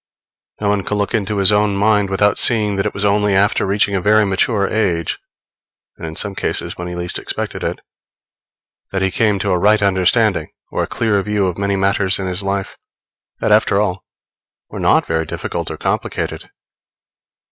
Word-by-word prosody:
No 105 - 0
one 100 -1 +1
can 105 - -2
look 100 +2 -2
into 105 -2 -1
his 100 0 +5
own 105 -1 +2
mind 105 0 +2
without 100 +1 +2
seeing 105 -3 +3
that 95 +2 0
it - - -4
was 100 - -1
only 105 0 +2
after 100 0 +2
reaching 100 +1 +2
a 95 - 0
very 105 +2 +4
mature 100 +1 +1
age, 90 -7 -1 0.8
and 80 - -7
in 80 - -7
some 100 +3 -1
cases - - -2
when 90 - -6
he 90 - -5
least 90 0 -4
expected - - -4
it, - - -3 1.1
that 95 -1 -1
he 95 - +1
came 105 -1 +1
to 100 0 -1
a 90 - +1
right 105 +3 +4
understanding 95 -3 +2 0.2
or - - -1
a - - -1
clear 110 -4 0
view 105 0 0
of 90 -2 -1
many 100 0 0
matters 95 -1 +1
in 95 - -4
his 90 +1 -3
life, 100 0 -3 0.6
that, - - +1
after 100 - +3
all, 95 -3 -1 0.7
were - - -6
not - - +3
very 80 -1 -1
difficult - - -4
or - - -6
complicated. - - -3
100 Hz, 190 wpm, -18 LUFS, 95-105 Hz, 1.1 s, his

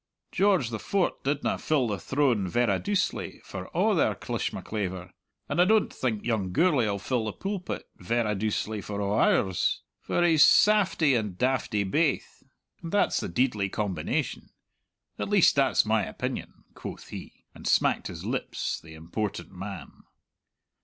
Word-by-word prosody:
George 190 - +2
the 110 - -3
Fort' 195 - -1
didna 145 +1 0
fill 145 -6 +1
the 105 -3 -2
throne 130 -8 +1
verra 120 +7 +1
doucely 205 -2 -1
for - - -7
a' - - +2
their - - +2
clishmaclaver, 95 -4 -4 0.4
and 175 - +1
I - - +6
don't 215 +2 +3
think 110 -5 -2
young 105 -6 0
Gourlay'll 125 - +2
fill 115 +3 -1
the 110 - -2
pulpit 195 -2 -4
verra 110 +3 0
doucely 105 +1 -2
for 100 +1 -5
a' 100 - -1
ours. 95 -3 +2 0.2
For 175 - 0
he's 160 -4 +6
saftie 190 -8 +5
and 105 -6 -1
daftie 125 -4 +1
baith, 145 - 0 0.4
and 165 - -6
that's 205 - +2
the - - -4
deidly 115 -6 +1
combination. 95 -7 -2 0.7
At - - -2
least, 205 -4 +5
that's 135 -1 +3
my 110 -1 +2
opinion," - - -5
quoth - - -8
he, - - -10
and - - -8
smacked - - +2
his - - -8
lips, - - -3
the 80 -1 -12
important 100 +6 -4
man. 95 -3 -8
115 Hz, 150 wpm, -27 LUFS, 100-155 Hz, 0.7 s, I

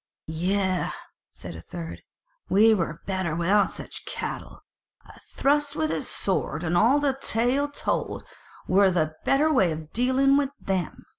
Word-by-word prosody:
"Yea," 185 +3 0 0.4
said 85 -1 -9
a 80 - -9
third, 165 - -8 0.5
"we 220 +3 +6
were 170 -5 -2
better 190 -5 -1
without 190 +4 +3
such - - -8
cattle. - - -6 0.4
A - - -15
thrust 290 +1 +1
with 315 0 0
a - - -1
sword - - -1
and 170 0 0
all 240 +10 +5
the 280 -2 +1
tale 250 +6 +1
told, 285 - -2 0.4
were 195 +1 +5
the 155 -4 0
better 305 +3 +3
way 190 - +3
of 155 0 -7
dealing 260 +3 +3
with 285 -2 +1
them." 185 -4 -3
195 Hz, 150 wpm, -26 LUFS, 170-270 Hz, 0.5 s, we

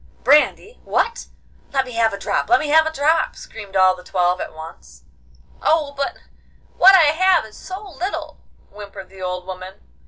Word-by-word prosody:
'Brandy! 300 - +2
What! 465 +1 -1 0.5
Let 270 -1 +1
me 250 - -9
have 230 -1 +1
a 200 - -5
drop! - - -2
Let 370 - +5
me 305 - -3
have 315 +1 +5
a - - -2
drop!' 315 +2 +1
screamed 200 -3 -11
all 185 -1 +4
the 180 - -14
twelve 180 0 0
at - - -6
once. 75 - -13 0.6
'Oh, 310 -3 +1
but 280 0 -3 0.6
what 385 +2 +7
I 310 -5 +5
have 370 -3 +3
is 220 - -15
so 385 +2 -9
little,' 360 +3 -6 0.3
whimpered 200 -2 -11
the 190 -1 -13
old 180 0 -4
woman. 185 0 -8
250 Hz, 180 wpm, -20 LUFS, -, 0.6 s, what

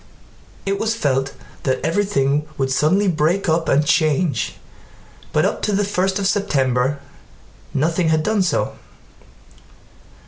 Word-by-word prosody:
It 195 0 -1
was 225 +1 0
felt 135 - -1 0.3
that 130 -2 0
everything 150 -6 +1
would 135 -1 -1
suddenly 185 +9 +2
break 175 +3 +1
up 165 0 +1
and 145 +2 +3
change, 155 -1 +1 0.8
but - - +2
up - - -1
to 210 - 0
the 200 +1 +1
first 190 -1 0
of 200 - -2
September 140 - +1 0.8
nothing 165 +4 +1
had 155 -1 +2
done 215 +1 +1
so. 185 - -1
160 Hz, 130 wpm, -20 LUFS, 140-195 Hz, 0.8 s, and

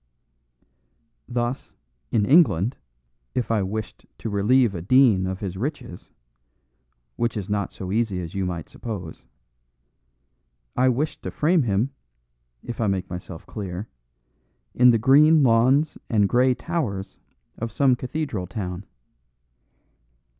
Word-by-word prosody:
Thus, 120 +1 -3 0.3
in 105 -3 +2
England, 130 - +4 0.6
if 125 -2 -1
I 110 -2 +2
wished 105 +3 -5
to 110 - -5
relieve 110 +3 +3
a 85 - -5
dean 105 -2 +4
of 95 0 -4
his 95 -2 -4
riches 125 - -5 1.1
(which 120 -1 -1
is 105 0 -4
not 100 -2 -1
so 95 -1 -7
easy 110 -3 0
as 85 -2 -6
you 95 - -2
might 85 -3 -4
suppose), 100 -9 -7 1.5
I 130 +1 +3
wished 140 +5 -1
to - - -5
frame 165 +2 +2
him, 115 +2 0 0.7
if 120 - -5
I 110 - +2
make 95 -3 -2
myself 90 -1 -8
clear, 100 -1 -6 0.8
in 125 0 +6
the 115 - +5
green 145 +6 +5
lawns 130 +5 +3
and 105 -3 +3
grey 125 +3 +3
towers 125 - -4 0.4
of 115 0 -3
some 130 +2 +3
cathedral 125 - -4
town. 95 -2 -5
115 Hz, 125 wpm, -24 LUFS, 95-130 Hz, 1.5 s, in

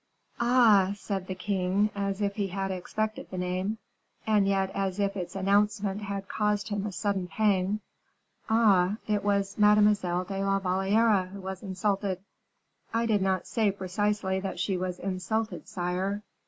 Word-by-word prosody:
"Ah!" 230 -6 +5
said 195 -2 -4
the 185 - -4
king, 195 +2 0
as 200 0 -2
if 200 -1 0
he 205 -2 -1
had 195 +1 -3
expected 215 +4 -3
the 185 - -6
name, 185 +4 -2 0.5
and 210 -2 +3
yet 195 -1 +1
as 195 0 -2
if 200 0 0
its 180 -1 -5
announcement 200 +1 +1
had 200 -1 -4
caused 210 0 0
him 205 0 -2
a - - -4
sudden 195 -1 -1
pang; 200 +1 +1 0.7
"ah! 210 -4 +4
it 210 -1 0
was 200 0 0
Mademoiselle 210 -4 +4
de 195 +1 -3
la 195 0 +2
Valliere 195 +2 +2
who 195 +2 -9
was 190 -1 -6
insulted." 195 -1 -1 0.7
"I 230 +1 +1
do 215 -3 +2
not 190 -1 0
say 220 -3 +1
precisely 190 0 -1
that 190 -2 -5
she 190 +1 0
was 180 0 -3
insulted, 200 +4 -3
sire." 185 +3 -2
195 Hz, 155 wpm, -28 LUFS, 190-210 Hz, 0.7 s, Ah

